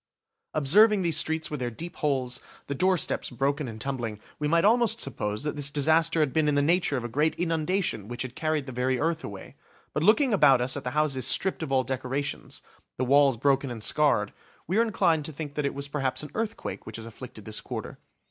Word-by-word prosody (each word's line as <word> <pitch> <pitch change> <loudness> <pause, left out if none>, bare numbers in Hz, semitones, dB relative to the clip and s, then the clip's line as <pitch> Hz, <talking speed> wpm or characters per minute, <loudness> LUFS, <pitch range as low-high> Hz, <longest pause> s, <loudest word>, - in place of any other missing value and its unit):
Observing 195 +8 +5
these 165 -3 +3
streets 160 0 +1
with 150 - -3
their 125 -1 -2
deep 165 +9 -7
holes, 130 -4 0 0.3
the 140 - -3
doorsteps 185 +3 +1
broken 140 +3 -1
and 110 -2 -8
tumbling, 120 -5 -4 0.2
we 150 - 0
might 170 +4 +3
almost 235 +1 +3
suppose 105 -3 -2
that 150 0 -2
this 145 -1 +2
disaster 160 +3 +2
had 150 -4 0
been 155 -1 +2
in 145 - +2
the 145 - +3
nature 170 -2 +2
of 125 - -4
a - - -3
great 150 +7 0
inundation 165 - -1
which 120 +2 -3
had 130 -1 -7
carried 155 -3 -1
the 130 - -7
very 125 +1 0
earth 165 +1 -1
away; 100 -2 -9 0.4
but 150 - -1
looking 225 - +4
about 135 -10 +5
us 125 +2 0
at 145 - -5
the 125 - -2
houses 140 -4 +1
stripped 190 - +2
of 155 -4 -4
all 130 -1 +3
decorations, 130 +2 -4 0.3
the 130 - 0
walls 140 -1 +4
broken 135 +2 +1
and 115 -3 -6
scarred, 120 -9 +2 0.3
we 190 +7 0
are - - +6
inclined 185 -8 +1
to 155 - -4
think 145 -1 -7
that 150 -1 -1
it - - -5
was 140 0 -4
perhaps 140 -1 -2
an 150 - -8
earthquake 225 0 -4
which 110 - -6
has 115 - -8
afflicted 115 -2 -10
this 110 0 -3
quarter. - - -7
145 Hz, 220 wpm, -27 LUFS, 130-160 Hz, 0.4 s, are